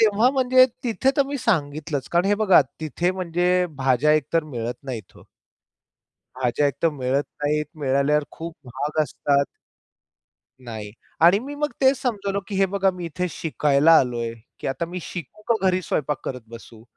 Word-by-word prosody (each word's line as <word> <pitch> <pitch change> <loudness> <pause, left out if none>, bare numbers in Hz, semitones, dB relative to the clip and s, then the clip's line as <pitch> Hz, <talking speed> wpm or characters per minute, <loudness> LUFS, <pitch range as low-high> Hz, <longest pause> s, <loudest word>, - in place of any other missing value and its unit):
तेव्हा 220 +2 +4
म्हणजे 255 -1 +5 0.2
तिथे 245 +3 +1
तर 280 - +5
मी 285 +1 -3
सांगितलंच. 150 - -1
कारण 175 +1 +3
हे 205 - +3
बघा, 205 -5 +5 0.2
तिथे 160 +3 -1
म्हणजे 180 0 +1
भाज्या 135 +2 +3
एक 155 -2 +2
तर 165 -1 +2
मिळत 120 -5 -4
नाहीत 115 -8 -6
हो. - - -16 1.1
भाज्या 130 +3 +1
एक 140 - -1
तर 165 - +5
मिळत 135 0 -1 0.2
नाहीत. 150 +1 +1 0.2
मिळाल्यावर 140 +2 +2
खूप 165 0 -8
महाग 145 +5 -1
असतात. 140 -1 +1 1.2
नाही 110 -3 -7 0.3
आणि 175 +4 +6
मी 275 +6 -7
मग 295 0 -2
तेच 265 -1 +4
समजवलं 200 -5 -1
की 205 - -5
हे 195 0 +4
बघा 195 0 +1
मी 180 -1 -6
इथे 180 +3 -3
शिकायला 150 -1 +2
आलोय. 120 -3 -1 0.3
की - - -5
आता 135 +5 -2
मी 180 +2 -6
शिकू 175 +5 -8
का 235 - +4
घरी 185 0 +2
स्वयंपाक 150 -3 -2
करत 125 -1 -4
बसू? 115 -1 -12
160 Hz, 170 wpm, -23 LUFS, 140-195 Hz, 1.2 s, आणि